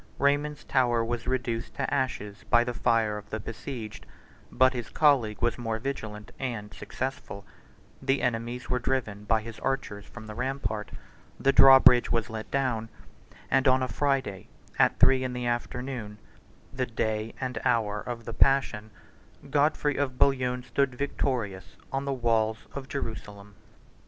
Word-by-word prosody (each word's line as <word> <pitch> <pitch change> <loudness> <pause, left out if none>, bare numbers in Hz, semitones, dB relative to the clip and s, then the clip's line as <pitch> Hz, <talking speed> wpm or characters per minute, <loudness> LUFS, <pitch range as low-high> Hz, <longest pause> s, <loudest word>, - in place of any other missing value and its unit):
Raymond's 145 +1 +1
Tower 120 -3 +2
was 115 0 -3
reduced 120 -3 -2
to 140 -1 -2
ashes 105 -8 -2
by 120 0 +5
the 120 0 -3
fire 110 -3 +1
of 105 0 -15
the 110 - -3
besieged, 115 0 -7 0.4
but 130 +2 +4
his 120 -3 -5
colleague 130 -9 +3
was 120 0 +1
more 115 -2 -2
vigilant 110 -4 -5
and 115 -6 -4
successful; 130 -6 -5 0.5
1091 - - -14
the 135 0 +2
enemies 120 +1 -2
were 125 - 0
driven 115 -5 -2
by 110 +1 +2
his 115 0 -9
archers 130 -7 -2
from 110 -2 -11
the 110 - -7
rampart; 125 -4 -3 0.5
the 135 - +3
draw 135 0 +9
bridge 125 -2 +6
was 115 0 0
let 110 -1 -6
down; 125 -5 -1 0.6
and 135 - +4
on 130 0 +4
a - - 0
Friday, 135 -10 -1 0.3
at - - +4
three 130 -1 +5
in 130 -1 -2
the 125 0 -3
afternoon, 120 -2 -3 0.6
the 130 -1 -1
day 110 -1 -2
and 125 -3 -3
hour 105 -4 +1
of 120 -2 -6
the 115 - -5
passion, 130 -6 +2 0.6
Godfrey 145 0 +2
of 130 -3 -1
Bouillon 125 -2 +2
stood 130 +1 0
victorious 115 - -2
on 135 +1 -2
the 140 - -1
walls 110 -3 0
of 135 -1 -6
Jerusalem. 105 -6 -6
120 Hz, 155 wpm, -28 LUFS, 110-135 Hz, 0.6 s, draw